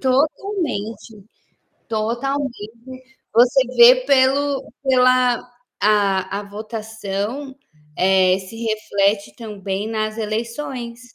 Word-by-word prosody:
Totalmente. 260 - -2 0.6
Totalmente. 240 +1 -4 0.3
Você 245 +3 +5 0.2
vê 240 +2 +9
pelo 275 +1 +3 0.2
pela 255 -2 +3 0.4
a 200 -2 +2
a - - -8
votação, 220 +4 -5 0.4
eh, 185 0 +3
se 190 +4 -10
reflete 215 -2 -1
também 205 -2 -5
nas 215 0 -2
eleições. 235 +3 -4
225 Hz, 80 wpm, -20 LUFS, 205-260 Hz, 0.6 s, vê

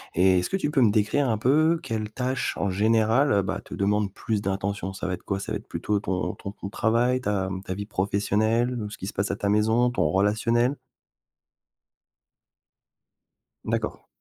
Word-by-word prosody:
et 90 +1 +4
est-ce 90 - -2
que 195 - 0
tu 150 -5 -1
peux 140 -4 +2
me 110 - +6
décrire 110 +6 +1
un 110 - +1
peu 155 +8 +3
quelles 110 -2 -3
tâches, 130 +2 -2
en 100 - 0
général, 110 +7 +3
heu, 100 -1 +3
bah, - - -3
te - - -8
demande 100 0 +1
plus 105 +1 -2
d'intention? 100 0 -2
Ça 95 - -6
va 90 - -1
être - - -5
quoi, 95 -1 -2
ça - - -6
va - - 0
être - - -18
plutôt 105 -1 -1
ton 95 -2 -2
ton 100 - -7
temps 100 - -8
de - - -10
travail, 120 +3 +1
ta 95 -4 -1
mmh, 95 0 -4
ta 95 - -3
vie 100 +1 -5
professionnelle, 110 +5 0
ou 105 - -4
ce - - -9
qui - - -7
se 100 - -5
passe 100 +2 -1
à - - -1
ta 100 - -2
maison, 110 +4 +3
ton 90 -10 +1
relationnel? 115 - +2 2.9
D'accord. - - -3
105 Hz, 205 wpm, -25 LUFS, 100-120 Hz, 2.9 s, me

